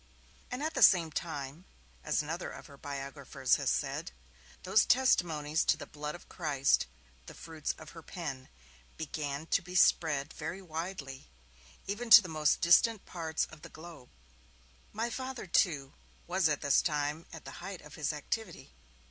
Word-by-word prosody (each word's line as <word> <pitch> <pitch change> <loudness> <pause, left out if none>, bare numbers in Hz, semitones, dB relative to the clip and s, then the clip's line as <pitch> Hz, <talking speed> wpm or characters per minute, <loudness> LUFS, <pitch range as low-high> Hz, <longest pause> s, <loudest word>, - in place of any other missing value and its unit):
At 295 +6 -3
the 265 - -1
same 170 -7 +6
time, 145 0 -5 0.4
as - - +1
another - - -4
of - - -10
her 140 - -13
biographers 140 -2 -1
has - - 0
said, - - -1 0.5
'those 190 +3 +4
testimonies 160 - +2
to - - +3
the - - -7
Blood 150 +1 -6
of 175 - -13
Christ, 145 - +1 0.4
the - - -10
fruits 160 -2 -4
of 155 0 -11
her 165 - -11
pen, 145 -6 -6 0.5
began 150 -1 -4
to 195 - +2
be 180 0 -9
spread 150 -5 +3
very 190 - -5
widely, 160 - -6 0.6
even 220 +4 -4
to 225 +1 +12
the - - -6
most 155 -2 +2
distant 190 +5 +5
parts 160 -3 -2
of 155 -1 -13
the - - -10
globe'. 160 -6 -12 0.8
My 230 +3 -2
Father, 260 -1 -5
too, 150 -7 +1 0.3
was 180 -2 +2
at 150 - 0
this 140 -1 +4
time 150 0 -1
at 160 - -10
the - - -7
height 190 -2 -7
of 150 0 -13
his 150 -1 -1
activity. 175 +6 -5
160 Hz, 160 wpm, -32 LUFS, 145-185 Hz, 0.8 s, to